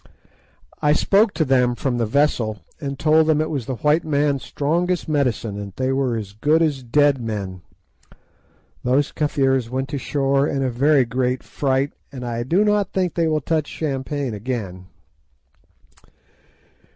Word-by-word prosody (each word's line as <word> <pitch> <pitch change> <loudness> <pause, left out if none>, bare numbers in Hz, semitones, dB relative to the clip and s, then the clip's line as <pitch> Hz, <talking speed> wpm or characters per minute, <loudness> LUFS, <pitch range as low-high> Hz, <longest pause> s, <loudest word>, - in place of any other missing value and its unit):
I 150 0 +4
spoke 200 +6 +3
to 160 - +1
them 125 -2 +2
from 125 -1 -2
the 115 - 0
vessel, 115 -4 +1 0.2
and 140 -1 -4
told 155 +2 +4
them 155 -1 +3
it 155 +1 -1
was 135 -7 -3
the 130 - -2
white 150 +8 +2
man's 145 -2 +1
strongest 175 +5 -1
medicine, 125 -8 -1
and 100 - -5
that 100 - -15
they 130 0 0
were 135 -3 0
as 100 -3 -6
good 150 +9 +2
as 145 -4 0
dead 140 +2 +2
men. 100 -5 -4 1.2
Those 135 +4 +1
Kafirs 135 -5 0
went 130 +2 -3
to 145 - -3
the - - -7
shore 140 0 +1
in 135 -1 -1
a 130 - 0
very 135 +2 +3
great 125 +1 -1
fright, 135 0 -1 0.2
and 125 -3 -7
I 120 -1 -3
do 170 - +2
not 210 -2 +1
think 180 -4 0
that 170 - -1
they 165 - +3
will 155 -1 +1
touch 155 +1 -1
champagne 140 -3 -3
again. 100 -5 -5
135 Hz, 170 wpm, -21 LUFS, 125-150 Hz, 1.2 s, I